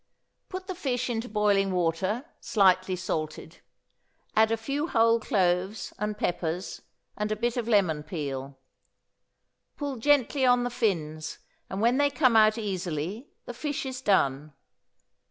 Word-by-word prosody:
Put 370 0 -6
the 375 - -4
fish 255 -8 -2
into 230 +1 -3
boiling 205 -2 +2
water, 185 - 0
slightly 185 -2 +3
salted; 160 -4 -4 0.8
add 220 0 +5
a 225 - +2
few 280 +7 -2
whole 230 -4 +4
cloves 190 0 0
and 210 0 -2
peppers, 175 -1 -2 0.3
and 210 0 -2
a - - +1
bit 235 +2 -1
of 240 -3 -2
lemon 185 -9 +2
peel; 140 -4 -5 1.2
pull 285 -3 -3
gently 280 +1 +2
on 245 -1 +4
the 245 - -2
fins, 160 -9 -2 0.3
and 195 - -3
when 240 +3 +3
they 285 0 +3
come 260 -4 +3
out 215 0 +6
easily 190 - -3 0.2
the 245 - -6
fish 290 +3 -3
is 260 -1 -5
done. 150 - +1
210 Hz, 140 wpm, -27 LUFS, 180-245 Hz, 1.2 s, out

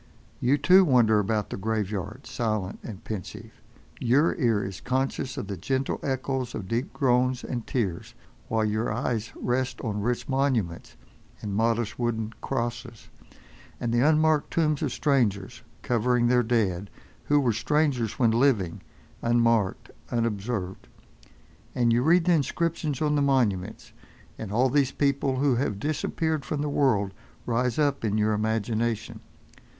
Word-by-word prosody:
You, 130 +4 +3
too, 180 +7 +6
wander 120 - +4
about 105 +1 -1
the - - -3
graveyard 105 +2 -3
silent 110 -5 -2
and 105 -5 -9
pensive. 105 -5 -7 0.5
Your 135 +7 +3
ear 115 -8 +2
is 95 -1 -6
conscious 130 0 -2
of - - -3
the 100 -1 -5
gentle 130 +9 -1
echoes 130 -2 -2
of 95 - -5
deep 120 - -2
groans 125 -1 +1
and 120 -3 -4
tears, 100 -9 -2 0.3
while 110 -1 +1
your 110 +2 -1
eyes 115 -3 -2
rest 125 0 -1
on 105 -3 -2
rich 120 +3 -1
monuments, 130 -11 -1 0.5
and 105 -2 -3
modest 115 +1 0
wooden 115 -2 -1
crosses; 120 -2 -4 0.7
and 115 -1 -2
the 120 - +3
unmarked 155 +2 +3
tombs 155 -3 +1
of - - -1
strangers, 115 -10 0 0.2
covering 120 0 +2
their 125 +1 +4
dead, 105 -5 0 0.4
who 145 0 +3
were 125 -5 +2
strangers 130 -2 0
when 115 -3 +3
living, 115 -8 +1 0.4
unmarked, 115 -4 +1 0.2
unobserved. 105 -4 -2 0.9
And 120 -2 +3
you 120 - +3
read 165 +5 +4
the 180 - +4
inscriptions 155 -1 -1
on 150 -1 +2
the 145 - +2
monuments, 120 -10 0 0.5
and 105 -3 -5
all 125 +4 +2
these 140 -2 +2
people 140 -1 0
who 130 -2 +2
have 105 -5 -1
disappeared 155 +2 -1
from 145 +2 -3
the 150 - -1
world 115 -9 +1 0.3
rise 120 0 0
up 145 -4 +1
in 110 -1 0
your 110 0 +2
imagination. 110 +1 -1
120 Hz, 145 wpm, -26 LUFS, 110-135 Hz, 0.9 s, too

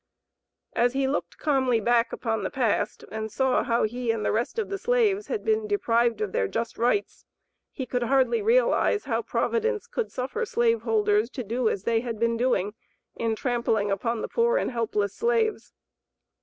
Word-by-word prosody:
As 240 +1 +2
he 270 0 +1
looked 280 - -3
calmly 260 -6 +2
back 235 +1 +2
upon 225 -2 -2
the - - -2
past, 245 -6 -1
and 220 0 -4
saw 265 +2 +2
how 235 0 +1
he 240 +2 -2
and 225 -2 0
the - - +2
rest 235 - -1
of 450 - -1
the 395 0 -3
slaves 430 -4 +1
had 450 - -3
been 440 -1 +1
deprived 235 - +1
of 210 -3 -1
their 95 - 0
just 230 - -4
rights 245 - 0 0.5
he 260 - -5
could 245 0 -2
hardly 270 - +2
realize 475 -1 +3
how 230 -3 -1
Providence 455 - -1
could 475 - -3
suffer 265 - -3
slave 235 - +1
holders 215 -1 +2
to 255 - -5
do 230 +2 0
as 195 - -3
they 230 0 +2
had 230 -1 -4
been 230 0 +1
doing 230 -5 0 0.4
in 225 -1 -1
trampling 225 -4 0
upon 225 +3 -1
the - - -2
poor 470 +1 +2
and - - -1
helpless 210 -4 -1
slaves. 460 -2 0
240 Hz, 185 wpm, -26 LUFS, -, 0.5 s, realize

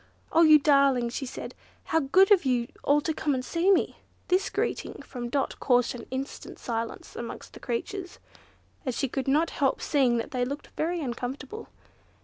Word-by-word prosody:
"Oh! 330 - +5
you 310 -2 +9
darlings!" 275 -5 +3
she 270 - -3
said, - - -7 0.3
"how 325 - +1
good 370 +8 +4
of 395 -3 +6
you 245 -3 +1
all 290 +1 +4
to 320 - -1
come 295 -2 0
and 255 0 -3
see 345 +3 +1
me!" 390 - +3 0.3
This 370 +2 +2
greeting - - -3
from 240 -2 -6
Dot 275 +1 -1
caused 245 -2 +3
an 240 -2 -9
instant 265 +2 -6
silence 230 -1 -4
amongst 235 - -7
the - - -11
creatures, 355 +10 -4 0.7
and 255 -5 -2
she 270 - 0
could 265 +1 -3
not 305 +5 +2
help 275 -2 +1
seeing 260 -5 +2
that 230 - -3
they 250 -2 0
looked 280 +4 -5
very 340 +2 -1
uncomfortable. 265 - -5
275 Hz, 180 wpm, -27 LUFS, 245-320 Hz, 0.7 s, you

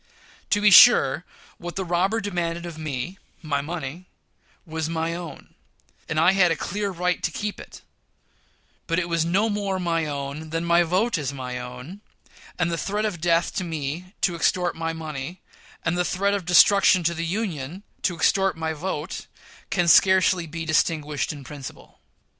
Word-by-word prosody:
To 205 - +2
be 210 0 +5
sure, 160 - +7 0.3
what 175 0 -7
the 190 - -2
robber 185 +6 +1
demanded 175 -4 -3
of 170 -2 -7
me 155 +4 -4 0.2
my 145 -3 -1
money 165 +2 -6 0.6
was 160 -1 -3
my 165 0 -2
own, 170 -1 -8 0.6
and 155 - 0
I 165 +3 +5
had 190 -2 +4
a 165 - +1
clear 205 +2 -3
right 180 -1 -1
to - - 0
keep 205 +5 -4
it; - - -12 1.0
but 165 - 0
it 175 -1 0
was 170 -1 +1
no 195 +6 +2
more 205 -3 -1
my 165 -3 0
own 145 +2 -5
than 165 +2 -2
my 170 0 +4
vote 185 +4 +1
is 140 -3 -2
my 125 -2 -5
own; 125 +10 -9 0.6
and 175 -1 0
the 165 - -2
threat 210 +4 -1
of 185 -6 -3
death 170 0 +2
to 185 - 0
me, 165 +3 -5
to 180 - +2
extort 175 +2 +1
my 165 0 -2
money, 160 +1 -6 0.5
and 165 +1 +1
the 180 - +1
threat 200 +3 0
of 200 -4 -2
destruction 185 +1 +5
to 170 +1 +1
the 165 0 -4
Union, 175 -3 -4 0.2
to 180 - 0
extort 190 +3 +2
my 160 0 -2
vote, 160 +1 -5 0.4
can 175 -2 +1
scarcely 185 -1 +5
be 165 +1 -5
distinguished 155 -2 0
in 145 -3 -9
principle. 140 -1 -10
170 Hz, 175 wpm, -24 LUFS, 155-185 Hz, 1.0 s, sure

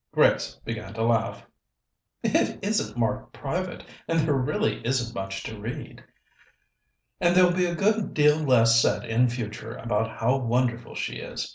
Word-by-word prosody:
Grace - - +3
began 110 -3 -6
to 115 - -1
laugh. 115 -1 0 0.8
"It - - +1
isn't 195 - -1
marked 115 -2 -1
private, - - -4 0.2
and 165 0 +1
there 155 -1 +1
really 150 - 0
isn't 120 -1 -1
much 95 -2 -5
to 110 -1 -7
read." 115 +4 -7 0.6
" - - -48
and 175 0 +3
there'll 180 -1 +6
be 180 0 +1
a 170 - -2
good 210 +2 +1
deal 150 0 +5
less 115 -5 +5
said - - +1
in 120 +2 +2
future 115 -2 -5
about 110 -1 -2
how 125 +4 +2
wonderful 120 -1 -1
she - - -3
is. - - -5
120 Hz, 160 wpm, -26 LUFS, 115-150 Hz, 0.8 s, there'll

